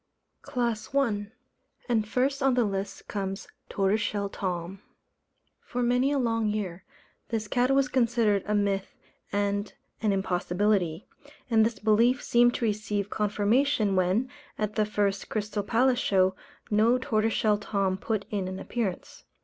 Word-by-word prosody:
CLASS 235 0 -3
I. 215 -7 +1 0.6
And 225 -4 +1
first 270 +5 0
on 270 -2 +3
the 245 - +3
list 195 -1 -4
comes 195 -1 -4 0.2
Tortoiseshell 200 0 0
Tom. 185 0 -4 0.8
For 245 0 -3
many 250 +3 +2
a 290 - +1
long 230 -4 +1
year, 200 -4 -3 0.5
this 220 -2 -2
cat 245 +4 +1
was 270 -1 +3
considered 235 -5 +2
a 210 - +1
myth 200 -1 -1 0.4
and 205 0 -1 0.3
an 215 -2 +2
impossibility; 185 -1 0 0.4
and 220 -1 +5
this 225 +1 0
belief 230 +4 +3
seemed 240 0 +4
to 235 - -1
receive 210 -1 -2
confirmation, 210 +1 +1
when, 185 +7 +2 0.3
at 210 -1 -2
the 215 -1 +1
first 200 -2 -1
Crystal 210 -1 -2
Palace 245 +4 +2
Show, 190 -3 +2 0.4
no 220 +4 +4
Tortoiseshell 220 -3 +1
Tom 195 -2 0
put 205 +1 -2
in 200 -3 -1
an 185 0 -5
appearance. 205 -3 -4
210 Hz, 140 wpm, -27 LUFS, 200-235 Hz, 0.8 s, and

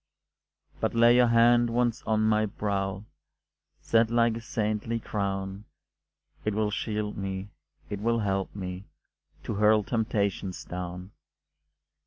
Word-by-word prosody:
But - - -1
lay 120 +1 +6
your 125 0 +5
hand 120 +1 +5
once 120 0 0
on 110 -1 +2
my 110 0 +3
brow, 100 -1 -2 0.8
Set 115 -1 +3
like 115 -1 +3
a - - -7
saintly 110 0 -2
crown, 100 -1 -3 0.8
It 105 -1 -1
will 105 -1 +1
shield 105 -1 -3
me, 95 0 -4 0.4
it 100 - -5
will 115 +2 +1
help 95 -1 -1
me 90 -1 -6 0.6
To - - -3
hurl 105 +1 +4
temptations 100 -6 -1
down. 90 +1 -6
105 Hz, 125 wpm, -28 LUFS, 95-115 Hz, 0.8 s, lay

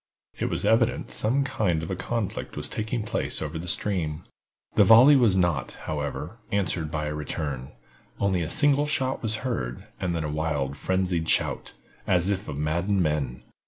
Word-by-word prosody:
It - - 0
was - - -2
evident - - +2
some 130 +6 +1
kind 90 -11 0
of 80 - -5
a - - -1
conflict 115 +1 -4
was - - -2
taking 110 +1 -3
place 105 - 0
over 80 +1 -4
the 85 - -7
stream. 85 -5 +1 0.5
The - - +5
volley 125 +6 +8
was 115 -8 +4
not, 85 -8 0
however, 75 +7 -4
answered 90 -5 0
by 75 -1 -3
a 75 - -3
return; 75 -2 -4 0.5
only 95 -3 +1
a 80 - -2
single 145 -1 +4
shot 135 -3 0
was 110 -1 +2
heard, 65 - -3
and 90 -2 -1
then 80 - -2
a - - -2
wild, 75 -3 -2
frenzied 90 0 0
shout, - - 0 0.3
as 90 +2 +2
if 100 +1 -3
of 70 - -5
maddened 85 +6 0
men. 70 -5 -2
90 Hz, 175 wpm, -26 LUFS, 75-105 Hz, 0.5 s, volley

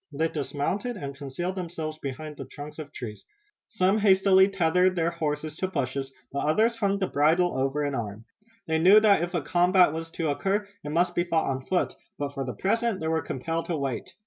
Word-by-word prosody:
They 160 +3 0
dismounted 165 - -2
and 140 -5 -5
concealed 145 +6 -4
themselves 165 -4 -5
behind 150 +2 -6
the - - -6
trunks 150 +2 -9
of 150 -2 -7
trees. 110 -7 -8 0.5
Some 195 0 +2
hastily 190 -1 +5
tethered 180 0 +2
their 170 -1 +1
horses 155 -2 -3
to 185 - -1
bushes, 135 -5 -3 0.2
but 140 - -2
others 225 +9 +3
hung 200 -3 +1
the 195 - 0
bridle 165 +3 +2
over 135 +3 0
an 145 -1 -1
arm. 110 -3 -5 0.4
They 160 -2 0
knew 190 +6 +8
that 210 -5 +4
if 175 +1 -3
a 165 - 0
combat 180 0 +4
was 165 0 -5
to 160 -3 -1
occur 200 +7 -1 0.2
it 145 - -5
must 175 +3 +1
be 175 - +1
fought 165 -5 +1
on 130 0 -5
foot, 185 - 0 0.2
but, 140 -1 -3
for 135 -1 -3
the 125 -1 -4
present, 225 +1 0
they 160 - -2
were 160 0 +1
compelled 165 +6 -3
to 170 - -1
wait. 135 -3 -4
165 Hz, 205 wpm, -27 LUFS, 145-185 Hz, 0.5 s, knew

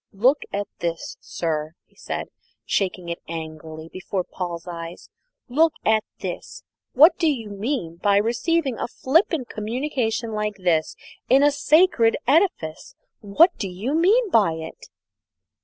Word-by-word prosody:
"Look 255 +9 +3
at 200 0 -2
this, 170 -1 -3
sir!" 155 -1 -3
he - - -34
said, - - -5 0.4
shaking 185 -3 -1
it 170 - -4
angrily 160 -1 -7
before 185 +2 -4
Paul's 175 -1 -6
eyes. 170 0 -8 0.4
"Look 315 +5 +3
at 220 -1 +3 0.2
this! - - -6 0.3
what 315 +6 +6
do 330 -3 +3
you 225 -7 -5
mean 200 - -3
by 200 +2 +3
receiving 250 +5 0
a - - -2
flippant 275 - +1
communication 230 0 -2
like 210 0 -2
this 175 -4 0 0.3
in 270 +3 +6
a 290 - +5
sacred 295 -4 +4
edifice? 275 - +1 0.2
What 290 - +4
do 195 - -2
you 200 +10 -3
mean 395 +7 +3
by 200 -7 +4
it?" 160 0 -8
215 Hz, 140 wpm, -23 LUFS, 175-285 Hz, 0.4 s, what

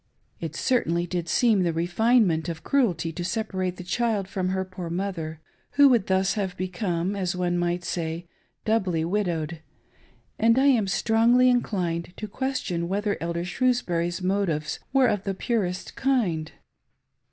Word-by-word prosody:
It 160 -2 -5
certainly 175 -8 +1
did 175 -1 -3
seem 225 -2 +3
the 170 -2 +1
refinement 175 0 +2
of 165 -2 -6
cruelty 180 - +1
to 175 +2 -5
separate 185 -2 -2
the 180 - -7
child 210 +1 0
from 185 -1 -2
her 190 0 -1
poor 185 -2 -7
mother, 170 -4 -3 0.3
who 285 -1 +7
would 235 -6 +3
thus 190 0 +2
have 190 -4 -3
become, 185 0 -2
as 185 -2 -1
one 180 -1 0
might 175 0 0
say, 170 0 -3 0.4
doubly 185 -7 +1
widowed; 170 -4 -1 0.8
and 230 +2 +4
I 265 - +4
am 240 -8 +4
strongly 235 +5 +4
inclined 175 -8 -1
to 215 - -5
question 210 -8 -2
whether 205 +2 0
Elder 170 +1 -2
Shrewsbury's 180 -6 0
motives 180 -6 0
were 270 -1 +4
of 205 -5 +1
the 195 -1 -2
purest 190 -5 -2
kind.. 215 - 0
185 Hz, 150 wpm, -25 LUFS, 170-220 Hz, 0.8 s, who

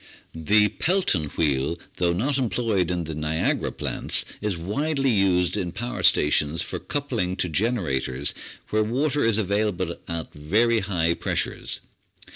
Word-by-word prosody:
The 105 +7 +3
Pelton 175 - +1
Wheel, 70 +1 +1 0.2
though 90 -1 +2
not 130 +11 0
employed 110 -7 0
in 90 -1 -1
the 80 0 -5
Niagara 75 +1 0
plants, - - +1 0.2
is 105 -4 -1
widely 135 - 0
used 95 -4 +2
in 90 -2 -2
power 120 +6 -5
stations 75 +2 +3
for - - -5
coupling 120 -11 -2
to 90 -1 -1
generators 75 - 0 0.4
where 110 - +2
water 140 +6 0
is 115 -2 +3
available 105 -2 0
at 85 -1 -5
very 110 +11 +2
high 90 -5 0
pressures. - - -2
95 Hz, 135 wpm, -24 LUFS, 80-115 Hz, 0.4 s, The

